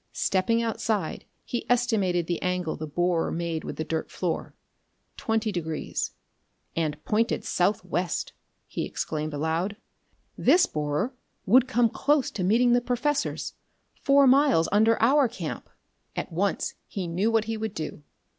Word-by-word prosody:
Stepping 230 +5 +1
outside, 220 -2 -2 0.2
he 240 - -3
estimated 215 -8 +2
the 175 0 -2
angle 180 -3 -1
the 155 - -6
borer 175 +2 0
made 165 -1 -2
with - - -5
the 155 - -2
dirt 160 0 -3
floor. 175 -3 -3 0.6
Twenty 225 -1 0
degrees. 160 -4 -3 0.7
"And 155 -2 -1
pointed 225 +2 +1
southwest!" 180 -2 0 0.3
he - - -4
exclaimed 155 0 -3
aloud. 160 +7 -1 0.6
"This 355 +1 +5
borer 150 - -2 0.3
would 250 +5 +5
come 245 -2 +3
close 280 +4 +1
to 185 - -3
meeting 240 +6 +4
the 245 - +4
professor's, 255 +4 -1 0.5
four 280 0 +5
miles 265 - +5
under 220 +3 +4
our 275 +3 +5
camp!" 185 -9 -6 0.5
At - - -4
once 190 +4 0
he 195 -3 -4
knew 185 +6 +1
what 225 -1 +2
he 225 +1 -2
would 220 -1 -4
do. 155 -1 -5
200 Hz, 140 wpm, -26 LUFS, 165-235 Hz, 0.7 s, This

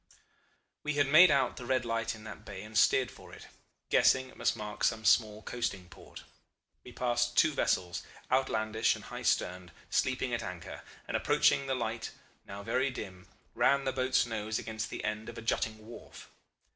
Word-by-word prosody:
We 150 0 -2
had 145 -1 +3
made 170 +5 +8
out 140 -2 +2
the 125 - -7
red 130 -1 +1
light 115 -1 -1
in 110 - -13
that 110 - -9
bay 100 -1 -8
and 110 +1 -11
steered - - +4
for - - -14
it, - - -12 0.5
guessing 130 0 +4
it - - -16
must - - 0
mark 105 -1 -6
some 110 -1 +1
small 105 0 +3
coasting 95 -7 -4
port. 85 - -13 0.6
We 125 - -11
passed 120 -1 0
two 155 - +5
vessels, 90 -9 0 0.3
outlandish 110 -4 +1
and - - -11
high - - -7
sterned, 90 -1 0 0.2
sleeping 130 -1 0
at 120 - -1
anchor, 90 -4 -7 0.3
and, - - -3
approaching 140 - +3
the 135 - 0
light, 115 -2 -3 0.4
now 100 +1 -8
very 130 +5 +1
dim, 95 -8 -8 0.3
ran 140 0 +3
the 130 - -1
boat's 130 -1 +2
nose 110 -1 -3
against 110 -1 -4
the - - -6
end 105 +1 -3
of 120 - -9
a - - -6
jutting 110 -1 -1
wharf. 115 +1 -12
115 Hz, 185 wpm, -31 LUFS, 105-130 Hz, 0.6 s, made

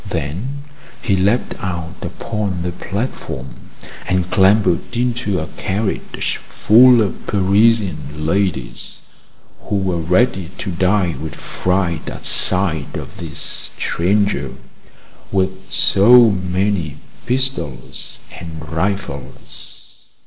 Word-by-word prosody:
Then 110 - -4 0.4
he 100 - 0
leaped 100 +6 +1
out 85 -4 -4
upon 100 -6 -3
the 90 - -2
platform, 95 - -5 0.5
and 90 -1 0
clambered 95 0 +3
into 120 -6 0
a 80 - -3
carriage 100 +2 -2
full 120 +1 +5
of 95 - -5
Parisian 100 -6 +1
ladies, 95 +1 -2 0.6
who 105 - -2
were 95 -3 0
ready 90 +1 +1
to 95 - -4
die 90 0 +1
with 80 -2 -6
fright 90 -4 -2
at - - -8
sight 85 -6 +4
of - - -9
this 80 -3 -7 0.4
stranger 90 -6 0 0.8
with 95 0 -2
so 115 +3 +6
many 90 -4 -1 0.3
pistols 125 - -2
and 80 -3 -9
rifles. 80 -8 -4
95 Hz, 100 wpm, -18 LUFS, 85-105 Hz, 0.8 s, so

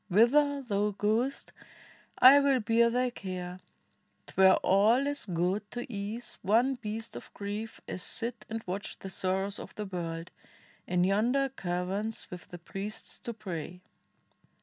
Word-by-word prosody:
Whither 280 +8 +4
thou 205 -3 0
goest 230 +6 0 0.6
I 270 +3 +9
will 280 -2 +3
bear 230 +1 +4
thy 250 +1 +1
care; 185 -4 -6 0.7
'T - - -13
were 190 0 +7
all 220 +8 +4
as 285 -5 -1
good 185 +4 -1
to 240 0 -5
ease 210 +4 -5
one 230 +7 +3
beast 225 -2 -5
of - - -9
grief 205 +2 -5
As 185 - -3
sit 230 0 -2
and 225 0 -4
watch 190 +3 -4
the 195 - -8
sorrows 190 +2 -1
of - - -9
the 210 - -4
world 170 -3 -5 0.6
In 180 0 +2
yonder 235 +9 +2
caverns 195 0 -3
with 180 -1 -8
the 175 - -9
priests 195 +4 -7
who 235 - -4
pray." 180 -4 -6
210 Hz, 150 wpm, -30 LUFS, 185-240 Hz, 0.7 s, I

